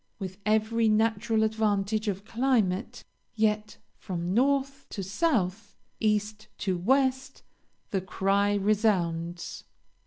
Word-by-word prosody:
With 190 Hz, -1 st, -7 dB
every 220 Hz, +1 st, +2 dB
natural 220 Hz, 0 st, +2 dB
advantage 215 Hz, -1 st, 0 dB
of 200 Hz, 0 st, -2 dB
climate, 225 Hz, -5 st, 0 dB, 0.3 s
yet 215 Hz, -1 st, 0 dB, 0.2 s
from 180 Hz, -2 st, -3 dB
North 275 Hz, +3 st, +1 dB
to 195 Hz, -, -5 dB
South, 205 Hz, -, -1 dB, 0.2 s
East 210 Hz, 0 st, 0 dB
to 190 Hz, -3 st, -1 dB
West 265 Hz, +7 st, +1 dB, 0.5 s
the 195 Hz, -, 0 dB
cry 195 Hz, +2 st, +1 dB
resounds. 180 Hz, -5 st, 0 dB
215 Hz, 100 wpm, -28 LUFS, 195-225 Hz, 0.5 s, every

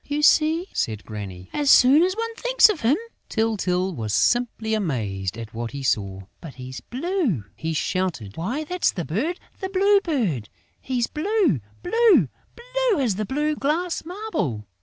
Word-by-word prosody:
"You 290 Hz, +1 st, -2 dB
see," 315 Hz, +3 st, +4 dB
said 110 Hz, -2 st, -2 dB
Granny, 95 Hz, -4 st, -7 dB
"as 290 Hz, -2 st, +1 dB
soon 275 Hz, +5 st, +7 dB
as 370 Hz, +2 st, +2 dB
one 460 Hz, +1 st, -3 dB
thinks -, -, +4 dB
of 405 Hz, -7 st, -2 dB
him...." 235 Hz, +6 st, +3 dB, 0.3 s
Tyltyl 190 Hz, -5 st, 0 dB
was 110 Hz, -7 st, -2 dB
simply 235 Hz, -2 st, +1 dB
amazed 110 Hz, -, -2 dB
at 115 Hz, -1 st, -8 dB
what 115 Hz, +1 st, -4 dB
he 140 Hz, -1 st, -5 dB
saw: 100 Hz, -6 st, 0 dB, 0.2 s
"But 160 Hz, -5 st, -9 dB
he's 130 Hz, -1 st, -7 dB
blue!" 270 Hz, -, -1 dB
he 160 Hz, 0 st, -3 dB
shouted. 155 Hz, -, -2 dB
"Why, 240 Hz, -, -2 dB
that's 360 Hz, +3 st, 0 dB
the 175 Hz, -5 st, -4 dB
bird, 275 Hz, -, -2 dB, 0.2 s
the 380 Hz, -, -3 dB
Blue 395 Hz, +1 st, +4 dB
Bird!... 195 Hz, -, -1 dB, 0.3 s
He's 250 Hz, -3 st, 0 dB
blue, 340 Hz, -, +1 dB, 0.2 s
blue, 375 Hz, -, +4 dB, 0.3 s
blue -, -, 0 dB
as 220 Hz, -7 st, 0 dB
a 215 Hz, -, -1 dB
blue 300 Hz, +4 st, 0 dB
glass 330 Hz, +5 st, -1 dB
marble!... 320 Hz, -, -3 dB
240 Hz, 160 wpm, -24 LUFS, -, 0.3 s, soon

